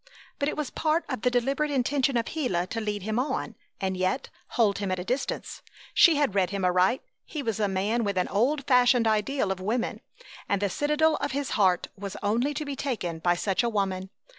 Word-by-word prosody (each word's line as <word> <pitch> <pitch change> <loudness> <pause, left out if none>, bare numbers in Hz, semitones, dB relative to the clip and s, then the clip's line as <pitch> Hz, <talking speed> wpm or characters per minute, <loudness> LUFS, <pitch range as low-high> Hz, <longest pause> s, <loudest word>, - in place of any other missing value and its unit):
But 285 - +1
it - - -5
was 300 -4 -3
part 320 +1 0
of 255 -6 -3
the 250 - +3
deliberate 270 +5 0
intention 275 -1 +1
of 230 - 0
Gila 235 - -1
to 225 +4 -4
lead 210 -2 -3
him 220 +3 -1
on 255 -3 -2 0.3
and 190 0 -1
yet 185 +8 -1 0.3
hold 210 -5 +3
him 200 -2 -2
at 185 - 0
a 180 - -4
distance. 250 +8 -3 0.3
She 335 - +7
had 285 -8 +1
read 190 -3 +2
him 195 -1 -2
aright. 180 +7 +3 0.2
He 300 -3 -5
was 225 -3 -2
a 210 - +2
man 200 +5 0
with 200 -2 -1
an 180 - +1
old 260 +8 +1
fashioned 250 -2 +4
ideal 215 +1 +1
of 190 - -3
woman, 225 +6 -2 0.5
and 200 - +2
the 200 -1 0
citadel 300 - +2
of - - -3
his 280 -1 -2
heart 185 -4 +3
was 200 -1 -6
only 240 +8 +1
to 305 +1 -3
be 285 -1 -4
taken 210 -12 -3
by 175 +1 +2
such 190 +1 0
a 240 - 0
woman. 190 -3 -1
225 Hz, 215 wpm, -27 LUFS, 195-275 Hz, 0.5 s, She